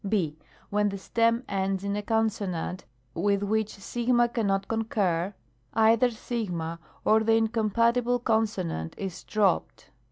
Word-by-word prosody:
II. 170 Hz, -8 st, +1 dB, 0.4 s
When 210 Hz, 0 st, +2 dB
the 200 Hz, -, -4 dB
stem 230 Hz, +4 st, +1 dB
ends 195 Hz, 0 st, -1 dB
in 200 Hz, 0 st, -1 dB
a 210 Hz, -, -1 dB
consonant 205 Hz, -5 st, -1 dB, 0.3 s
with 200 Hz, +4 st, +1 dB
which 215 Hz, +1 st, 0 dB
6 235 Hz, +4 st, -4 dB, 0.2 s
cannot 195 Hz, -4 st, 0 dB
concur 200 Hz, -6 st, 0 dB, 0.5 s
(§8), -, -, 0 dB
either 225 Hz, +3 st, +5 dB
6 230 Hz, -3 st, -4 dB, 0.5 s
or 220 Hz, -, +5 dB
the 225 Hz, 0 st, +2 dB
incompatible 230 Hz, +2 st, +2 dB
con 225 Hz, -2 st, +2 dB
sonant 170 Hz, -, -4 dB
is 190 Hz, -3 st, -5 dB
dropped. 205 Hz, -4 st, 0 dB
215 Hz, 135 wpm, -27 LUFS, 195-225 Hz, 0.5 s, either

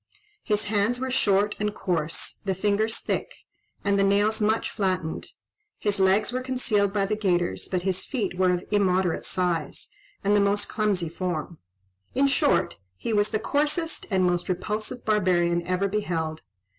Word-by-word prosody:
His 210 Hz, 0 st, +1 dB
hands 210 Hz, +3 st, +1 dB
were 260 Hz, 0 st, -2 dB
short 205 Hz, -4 st, +2 dB
and 210 Hz, 0 st, -1 dB
coarse, 170 Hz, -4 st, -2 dB
the 195 Hz, -2 st, -1 dB
fingers 210 Hz, +3 st, +1 dB
thick, -, -, -3 dB, 0.5 s
and 200 Hz, 0 st, +3 dB
the -, -, +4 dB
nails 205 Hz, +3 st, +2 dB
much 220 Hz, +2 st, +1 dB
flattened: 185 Hz, -6 st, -2 dB, 0.5 s
his 205 Hz, -1 st, 0 dB
legs 190 Hz, +5 st, +3 dB
were 255 Hz, -, -1 dB
concealed 245 Hz, -6 st, +1 dB
by 200 Hz, -1 st, +1 dB
the 215 Hz, +2 st, 0 dB
gaiters, 180 Hz, -5 st, 0 dB
but 180 Hz, -2 st, -1 dB
his 190 Hz, -1 st, 0 dB
feet 210 Hz, -9 st, -2 dB
were 185 Hz, 0 st, +3 dB
of 180 Hz, 0 st, -1 dB
immoderate 190 Hz, -4 st, +2 dB
size, 180 Hz, -3 st, -1 dB, 0.3 s
and 205 Hz, +1 st, +3 dB
the -, -, +5 dB
most 200 Hz, +1 st, +1 dB
clumsy 205 Hz, -6 st, 0 dB
form. 170 Hz, -1 st, -4 dB, 0.6 s
In 275 Hz, +2 st, +4 dB
short, 275 Hz, -, +2 dB, 0.2 s
he 225 Hz, -, -3 dB
was 205 Hz, 0 st, +3 dB
the 215 Hz, -, 0 dB
coarsest 300 Hz, +7 st, -1 dB
and 190 Hz, -3 st, +2 dB
most 175 Hz, 0 st, 0 dB
repulsive 210 Hz, +6 st, -3 dB
barbarian 180 Hz, -5 st, +2 dB
ever 185 Hz, +2 st, +1 dB
beheld. 165 Hz, -6 st, -2 dB
200 Hz, 160 wpm, -26 LUFS, 180-215 Hz, 0.6 s, the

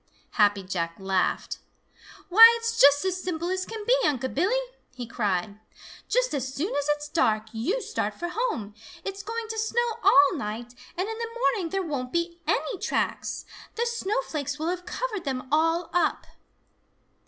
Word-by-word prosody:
Happy 205 Hz, -3 st, +3 dB
Jack 170 Hz, -3 st, -3 dB
laughed. 190 Hz, -1 st, -1 dB, 0.7 s
"Why, 455 Hz, +5 st, +10 dB
it's 460 Hz, 0 st, -1 dB
just 285 Hz, +4 st, +6 dB
as 370 Hz, 0 st, -1 dB
simple 345 Hz, -1 st, -3 dB
as 370 Hz, 0 st, -2 dB
can 440 Hz, -2 st, -6 dB
be, -, -, +5 dB
Unc' 260 Hz, -3 st, 0 dB
Billy!" 420 Hz, -, +1 dB, 0.3 s
he 250 Hz, -1 st, -5 dB
cried. 205 Hz, -3 st, -2 dB, 0.5 s
"Just -, -, +1 dB
as 265 Hz, -2 st, -2 dB
soon 325 Hz, +5 st, -2 dB
as 285 Hz, 0 st, -1 dB
it's 295 Hz, 0 st, -8 dB
dark, 220 Hz, -9 st, +1 dB
you 340 Hz, -, -1 dB
start -, -, -2 dB
for 345 Hz, -, -4 dB
home. 355 Hz, -, -2 dB, 0.3 s
It's 395 Hz, 0 st, -4 dB
going 450 Hz, +2 st, -4 dB
to 445 Hz, 0 st, -3 dB
snow 460 Hz, +1 st, 0 dB
all 380 Hz, +1 st, +6 dB
night, 235 Hz, 0 st, -5 dB, 0.2 s
and 370 Hz, +3 st, -1 dB
in 445 Hz, 0 st, -5 dB
the 460 Hz, -1 st, -3 dB
morning 400 Hz, -8 st, +1 dB
there 390 Hz, +2 st, -1 dB
won't 260 Hz, -5 st, -3 dB
be 340 Hz, 0 st, -2 dB
any 435 Hz, -7 st, 0 dB
tracks. -, -, -2 dB, 0.3 s
The 470 Hz, -, 0 dB
snowflakes 390 Hz, -, -2 dB
will 320 Hz, +2 st, -2 dB
have 360 Hz, 0 st, -4 dB
covered 440 Hz, -7 st, -3 dB
them 260 Hz, -2 st, -3 dB
all 330 Hz, +2 st, +2 dB
up." 355 Hz, -, +1 dB
340 Hz, 165 wpm, -26 LUFS, -, 0.7 s, Why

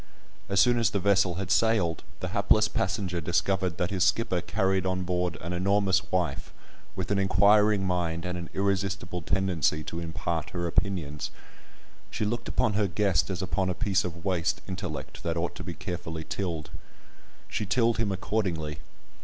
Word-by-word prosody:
As 100 Hz, -1 st, +2 dB
soon 120 Hz, +4 st, +5 dB
as 115 Hz, -, +3 dB
the 100 Hz, -, -1 dB
vessel 100 Hz, -2 st, +3 dB
had 95 Hz, 0 st, -3 dB
sailed, 100 Hz, -5 st, +2 dB, 0.2 s
the -, -, -2 dB
hapless 110 Hz, 0 st, +3 dB
passenger 95 Hz, -3 st, -1 dB
discovered 85 Hz, +1 st, 0 dB
that 90 Hz, +4 st, -1 dB
his 95 Hz, -3 st, +2 dB
skipper 95 Hz, -3 st, +2 dB
carried 95 Hz, -1 st, +1 dB
on 95 Hz, 0 st, -1 dB
board 90 Hz, -1 st, -1 dB
an 85 Hz, +2 st, -4 dB
enormous 95 Hz, +2 st, +2 dB
wife, 90 Hz, -1 st, -1 dB, 0.4 s
with 95 Hz, +2 st, -3 dB
an 100 Hz, -, +2 dB
inquiring 100 Hz, +1 st, +4 dB
mind 85 Hz, -2 st, -1 dB
and 90 Hz, 0 st, -2 dB
an 85 Hz, -1 st, -6 dB
irresistible 95 Hz, -2 st, -1 dB
tendency 85 Hz, -3 st, +1 dB
to 85 Hz, -, -5 dB
impart 80 Hz, -1 st, -3 dB
her 85 Hz, -, -1 dB
opinions. 85 Hz, -5 st, -1 dB, 0.8 s
She 105 Hz, -, -2 dB
looked 120 Hz, +3 st, -2 dB
upon 120 Hz, -4 st, +1 dB
her 105 Hz, 0 st, +2 dB
guest 85 Hz, -5 st, +1 dB
as 95 Hz, 0 st, -2 dB
upon 95 Hz, 0 st, 0 dB
a 90 Hz, -, -1 dB
piece 100 Hz, -3 st, +1 dB
of 85 Hz, -1 st, -6 dB
waste 90 Hz, -3 st, 0 dB
intellect 95 Hz, -4 st, -5 dB
that 85 Hz, 0 st, -2 dB
ought 85 Hz, +1 st, -1 dB
to -, -, -7 dB
be -, -, -6 dB
carefully 80 Hz, -2 st, -5 dB
tilled. 80 Hz, -5 st, -4 dB, 0.8 s
She 105 Hz, -, -3 dB
tilled 115 Hz, +2 st, +2 dB
him 110 Hz, -3 st, +1 dB
accordingly. 90 Hz, -6 st, -2 dB
95 Hz, 170 wpm, -28 LUFS, 85-100 Hz, 0.8 s, soon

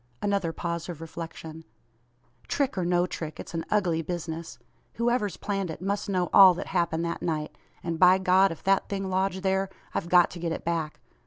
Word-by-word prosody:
Another 200 Hz, -5 st, 0 dB
pause 170 Hz, +1 st, -4 dB
of 170 Hz, -3 st, -6 dB
reflection. 160 Hz, -1 st, -8 dB, 0.8 s
"Trick, 280 Hz, -2 st, 0 dB
or 185 Hz, -, -1 dB
no 175 Hz, 0 st, +2 dB
trick, 160 Hz, -3 st, -6 dB
it's -, -, -8 dB
an 165 Hz, -1 st, -2 dB
ugly 180 Hz, -6 st, +1 dB
business. 165 Hz, 0 st, -5 dB, 0.4 s
Whoever's 235 Hz, -5 st, 0 dB
planned 195 Hz, -3 st, -2 dB
it, 160 Hz, -, -6 dB
must 200 Hz, +3 st, -2 dB
know 180 Hz, -2 st, 0 dB
all 190 Hz, -2 st, +9 dB
that -, -, -5 dB
happened 170 Hz, -2 st, +1 dB
that 170 Hz, -, -3 dB
night; 155 Hz, -3 st, -2 dB, 0.3 s
and 165 Hz, -1 st, -3 dB
by 185 Hz, 0 st, +7 dB
God, 190 Hz, 0 st, +4 dB
if 165 Hz, -, -9 dB
that 195 Hz, 0 st, +2 dB
thing 195 Hz, -1 st, -3 dB
lodged 190 Hz, 0 st, 0 dB
there, 190 Hz, 0 st, +1 dB, 0.2 s
I've 170 Hz, -, -3 dB
got 180 Hz, -1 st, +5 dB
to 175 Hz, -, -8 dB
get 170 Hz, -1 st, -2 dB
it -, -, -7 dB
back. 165 Hz, -2 st, -2 dB
175 Hz, 190 wpm, -27 LUFS, 165-195 Hz, 0.8 s, all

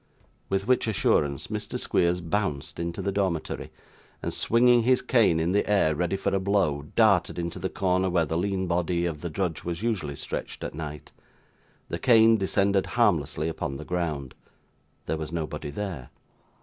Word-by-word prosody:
With 95 Hz, 0 st, 0 dB
which 125 Hz, -2 st, +2 dB
assurance, 75 Hz, -9 st, +1 dB
Mr. -, -, -4 dB
Squeers 90 Hz, +1 st, +1 dB
bounced 85 Hz, -5 st, -2 dB
into 85 Hz, 0 st, -3 dB
the 100 Hz, -, 0 dB
dormitory, 95 Hz, -5 st, -2 dB, 0.5 s
and, -, -, -2 dB
swinging 120 Hz, +1 st, +4 dB
his 130 Hz, +2 st, +3 dB
cane 115 Hz, -9 st, +3 dB
in 80 Hz, +2 st, 0 dB
the 105 Hz, +2 st, +1 dB
air 95 Hz, -7 st, +3 dB
ready 90 Hz, +4 st, -1 dB
for 95 Hz, -, -1 dB
a 95 Hz, -, +2 dB
blow, 95 Hz, -7 st, 0 dB
darted 105 Hz, -7 st, +3 dB
into 85 Hz, +1 st, -4 dB
the 95 Hz, +1 st, -2 dB
corner 95 Hz, 0 st, +1 dB
where 85 Hz, -2 st, +2 dB
the 80 Hz, -, -3 dB
lean 95 Hz, +2 st, 0 dB
body 85 Hz, 0 st, 0 dB
of 80 Hz, -3 st, -3 dB
the 85 Hz, -, -3 dB
drudge 85 Hz, -1 st, -2 dB
was 85 Hz, +3 st, -4 dB
usually 95 Hz, -12 st, -1 dB
stretched -, -, -5 dB
at -, -, -4 dB
night. 75 Hz, -1 st, -7 dB, 0.8 s
The 85 Hz, -, -3 dB
cane 115 Hz, -3 st, +6 dB
descended 100 Hz, 0 st, +1 dB
harmlessly 80 Hz, -, +2 dB
upon 80 Hz, -3 st, -3 dB
the 75 Hz, -, -8 dB
ground. 80 Hz, -7 st, -3 dB, 0.7 s
There 80 Hz, -, -1 dB
was 80 Hz, 0 st, -5 dB
nobody 75 Hz, -3 st, -4 dB
there. 80 Hz, -5 st, -5 dB
90 Hz, 170 wpm, -26 LUFS, 80-100 Hz, 0.8 s, cane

